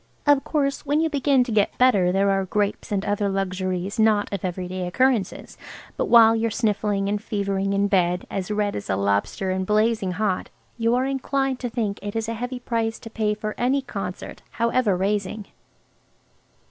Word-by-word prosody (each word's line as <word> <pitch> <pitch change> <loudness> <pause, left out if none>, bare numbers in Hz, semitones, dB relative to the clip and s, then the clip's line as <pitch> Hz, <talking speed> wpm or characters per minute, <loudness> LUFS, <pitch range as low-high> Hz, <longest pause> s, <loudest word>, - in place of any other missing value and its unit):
Of 290 -2 +4
course, 280 -3 -1
when 290 +1 +1
you 320 -1 +1
begin 275 -2 +3
to 245 - -5
get 210 -2 +1
better 205 -8 +4
there 195 +1 +2
are 195 0 +1
grapes 205 +2 -2
and 200 -1 -1
other 205 0 0
luxuries 185 0 -2
not 215 -2 +3
of 195 - -4
everyday 185 0 -3
occurrences, 240 +2 0 0.4
but - - -1
while 225 -1 +7
you're 225 0 0
sniffling 210 -3 0
and 205 0 -1
fevering 200 -2 -1
in 200 0 +2
bed, 180 -2 +1
as 190 -1 -4
red 210 -1 -1
as 100 - -6
a 95 - +2
lobster 100 - 0
and 190 0 -1
blazing 215 -1 +1
hot, 200 -1 -1 0.3
you 230 0 +1
are 255 +1 +1
inclined 270 -1 -1
to 245 - -3
think 220 -4 -2
it 205 +1 -6
is 225 0 -1
a 230 - -2
heavy 245 +2 -4
price 230 -2 -2
to 225 - -11
pay 215 -2 0
for 215 0 -4
any 265 +3 +1
concert, 195 -7 -6
however 235 -4 +1
raising. 205 +2 -1
210 Hz, 185 wpm, -23 LUFS, 195-235 Hz, 0.4 s, while